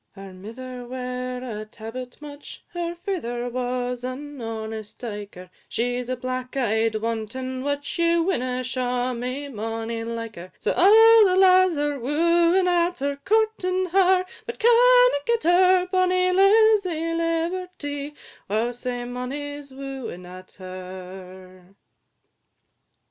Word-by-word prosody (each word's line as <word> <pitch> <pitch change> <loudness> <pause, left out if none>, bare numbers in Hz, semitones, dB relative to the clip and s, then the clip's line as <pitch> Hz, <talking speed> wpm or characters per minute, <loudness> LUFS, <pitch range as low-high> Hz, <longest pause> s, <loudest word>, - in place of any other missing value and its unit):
II. 195 - -9
Her 195 -1 -10
mither 245 +6 -9
ware 250 0 -4
a 215 -4 -5
tabbit 230 +3 -9
mutch, 290 -1 -10
Her 345 -1 -4
father 280 -10 -3
was 250 0 -2
an 275 +2 -6
honest 220 -1 -6
dyker, 205 -5 -8 0.2
She 245 +1 -1
's 250 - -9
a 255 - 0
black 255 +1 -5
eyed 225 -2 +1
wanton 230 +4 -3
witch, 285 +3 -3
Ye 335 0 +3
winna 255 -8 0
shaw 250 0 -1
me 255 +4 -4
mony 225 -1 -4
like 230 -2 -5
her: 180 +2 -9
So - - -1
a' 445 +4 +7
the 365 - +2
lads 370 -2 +5
are 290 -1 -1
wooing 340 +7 +3
at 350 0 +2
her, 280 +1 -2
Courting 385 -4 +1
her, 370 0 +4 0.2
but 470 - -5
canna - - +6
get 470 -1 +1
her; 365 +1 +5
Bonny 365 0 +2
Lizzy 390 -4 +4
Liberty, 330 -3 -3 0.3
wow, 220 +4 0
sae 245 0 -4
mony 280 +4 -5
's 280 - -15
wooing 265 -9 -7
at 185 +1 -12
her! 185 0 -10
255 Hz, 130 wpm, -24 LUFS, 230-350 Hz, 0.3 s, a